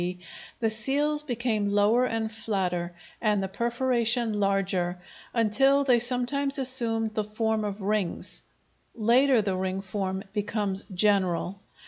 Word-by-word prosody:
D., 180 +1 -3 0.4
the 225 -2 +1
seals 285 +7 +2
became 235 -6 -1
lower 205 +5 +3
and 225 -1 -2
flatter, 185 -6 -2 0.3
and 210 -3 +1
the - - -1
perforation 235 0 0
larger, 195 -3 0 0.3
until 270 +5 +3
they 250 -3 +4
sometimes 260 +4 +1
assumed 230 -4 +1
the 215 - -1
form 220 +1 -1
of 205 -1 -4
rings; 205 -3 -2 0.5
later 240 +2 +3
the 195 -2 -1
ring 185 0 -2
form 190 0 -3
becomes 205 -2 -2
general. 190 -1 +1
215 Hz, 125 wpm, -27 LUFS, 195-240 Hz, 0.5 s, they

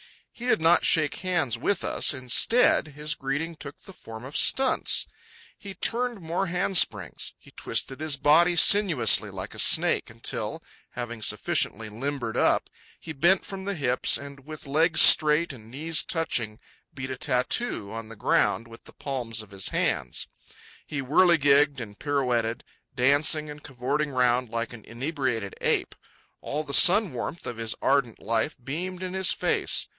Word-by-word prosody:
He 240 - -8
did 245 - +2
not 165 +2 +4
shake 155 -4 +2
hands 170 -11 -2
with 195 +8 -1
us; - - +2
instead, 130 - +3
his 150 +1 -4
greeting 150 +4 -4
took 145 -2 -11
the 195 - -12
form 110 -8 -11
of 140 +3 -10
stunts. 265 +8 +3 0.5
He 195 -1 -11
turned 240 -1 -2
more 175 +3 -3
handsprings. 170 - 0
He - - -19
twisted 135 - -3
his 155 -2 -1
body 160 +5 +4
sinuously, 170 - +4
like - - -7
a - - -9
snake, - - +3
until, - - -5 0.3
having 120 -2 -7
sufficiently 110 +1 -1
limbered 120 +1 -5
up, - - +1 0.3
he 160 - -9
bent 175 +6 +2
from 190 -1 -8
the 200 0 -3
hips, 130 -5 +2
and, 140 -1 -12
with 155 -1 -9
legs 155 +4 +2
straight 155 +1 +6
and 110 -3 -14
knees 155 +6 0
touching, 120 -10 -2 0.3
beat 130 -1 -7
a 130 - -5
tattoo 125 - -1
on 115 -1 -7
the 115 - -10
ground 115 +2 0
with 115 0 -15
the - - -15
palms 120 -5 -5
of 105 - -18
his 95 -1 -2
hands. 60 -2 -2 0.6
He 145 - -5
whirligigged 145 -2 +3
and 105 -3 -9
pirouetted, 125 -5 -1 0.3
dancing 145 +4 +2
and 150 0 -11
cavorting 140 +3 -3
round 125 -2 +1
like 115 +1 -4
an 110 -3 -12
inebriated 125 -4 -4
ape. - - 0 0.5
All 150 +2 -4
the 140 - -7
sun 195 - +6
warmth 125 +7 -6
of 120 - -6
his 115 -1 -2
ardent 135 -5 +1
life 110 +1 -2
beamed 180 +7 -5
in 185 0 -5
his 190 -1 +2
face. - - 0
140 Hz, 160 wpm, -25 LUFS, 120-165 Hz, 0.6 s, straight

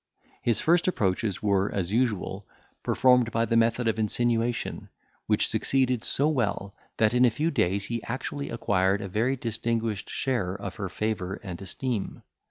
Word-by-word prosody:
His 115 -2 +1
first 170 +2 +3
approaches 100 - 0
were, 100 -1 +2
as 95 -2 -2
usual, 105 -5 -1 0.3
performed 125 -2 +4
by 115 +1 +1
the 115 - 0
method 115 +1 +2
of 110 0 0
insinuation, 115 +2 0 0.4
which - - +3
succeeded 130 -3 +1
so 145 - +3
well, 105 -9 -1 0.2
that 110 +1 +3
in 125 0 +4
a 125 - +7
few 150 +9 -1
days 95 - +1
he 115 0 -3
actually 140 +4 -4
acquired 100 -3 +1
a - - -4
very 115 +8 0
distinguished 115 -3 -2
share 100 -9 -1
of 100 -2 -6
her 100 -3 -3
favour 100 -2 -2
and 90 -2 -7
esteem. 115 +2 -4
115 Hz, 160 wpm, -27 LUFS, 100-125 Hz, 0.4 s, a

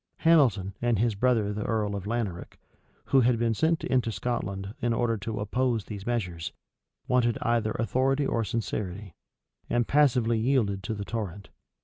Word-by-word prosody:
Hamilton, 120 - +4
and 120 -2 +2
his 115 +2 +2
brother 110 -1 +1
the 105 - -4
earl 105 -3 -1
of 100 -1 -5
Laneric, 105 -6 -3 0.5
who 135 - +4
had 120 0 +3
been 115 0 +1
sent 160 +8 +1
into 125 -3 +1
Scotland 100 -4 -3
in 120 0 +1
order 115 0 +1
to 105 +2 -4
oppose, 115 +1 0
these 100 -1 -7
measures, 90 -9 -2 0.6
wanted 120 -2 +2
either 115 -2 +1
authority 135 +5 +1
or 115 -3 0
sincerity; 105 -4 -4 0.6
and 120 -1 +1
passively 125 -6 +3
yielded 110 -5 +1
to 105 +3 -4
the 100 -1 -5
torrent. 100 -4 -5
115 Hz, 155 wpm, -27 LUFS, 100-120 Hz, 0.6 s, Hamilton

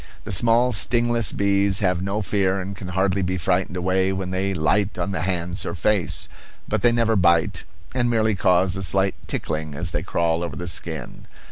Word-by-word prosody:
The - - -7
small 115 +6 +4
stingless 120 -2 +3
bees 100 -1 +2
have 90 -3 0
no 100 +3 -2
fear 95 -1 0
and 95 +1 -6
can 90 0 -8
hardly 95 +1 0
be 95 0 -1
frightened 90 +1 -1
away 95 +1 +1
when 95 -1 -4
they 95 +1 -1
light 95 +4 0
on 90 +2 -2
the 90 -5 -3
hands 90 0 -2
or 85 - -4
face; 95 +2 0 0.4
but - - -1
they 120 - +4
never 115 -1 +1
bite, 85 -4 +2 0.3
and 120 -2 0
merely 110 -2 +1
cause 90 -2 +2
a 95 - -4
slight 95 +2 +1
tickling 75 -1 -3
as - - -1
they - - -2
crawl 85 -1 -1
over 85 -3 -5
the 90 - -6
skin. 80 -5 -5
95 Hz, 195 wpm, -22 LUFS, 90-100 Hz, 0.4 s, small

